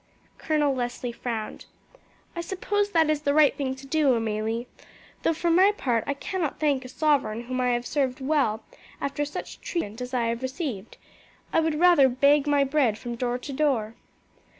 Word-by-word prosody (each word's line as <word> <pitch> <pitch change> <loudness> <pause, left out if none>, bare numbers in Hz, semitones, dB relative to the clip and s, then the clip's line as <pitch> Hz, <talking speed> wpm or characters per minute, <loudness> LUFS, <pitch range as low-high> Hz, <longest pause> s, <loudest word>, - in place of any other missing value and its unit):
Colonel 300 -3 +1
Leslie 245 -1 -3
frowned. 230 -2 -5 0.7
"I 340 - -2
suppose 405 +3 -1
that 325 -5 +3
is 305 -1 0
the 285 -1 +1
right 305 -2 +5
thing 265 -2 -2
to 265 +1 -12
do, 280 -2 +2
Amelie; 225 +1 -2 0.6
though, - - +2
for 340 +2 0
my 375 +4 +6
part, 240 - 0
I 280 - -1
cannot 330 +1 -3
thank 285 -4 +1
a 255 - -9
sovereign 270 -7 +1
whom 255 +1 -3
I 250 - +2
have 240 0 -2
served 265 -3 -1
well 265 -6 0 0.4
after 285 +1 -2
such 290 - -7
treatment 230 - -4
as 250 0 -5
I 245 -3 0
have 230 +1 -2
received. 260 - -5 0.6
I - - +4
would 320 -1 +1
rather 345 -7 +6
beg 280 +3 +3
my 290 -1 +3
bread 270 -6 +1
from 240 +1 -6
door 245 +1 -2
to 275 +3 -7
door." 260 -7 0
270 Hz, 180 wpm, -26 LUFS, 240-305 Hz, 0.7 s, my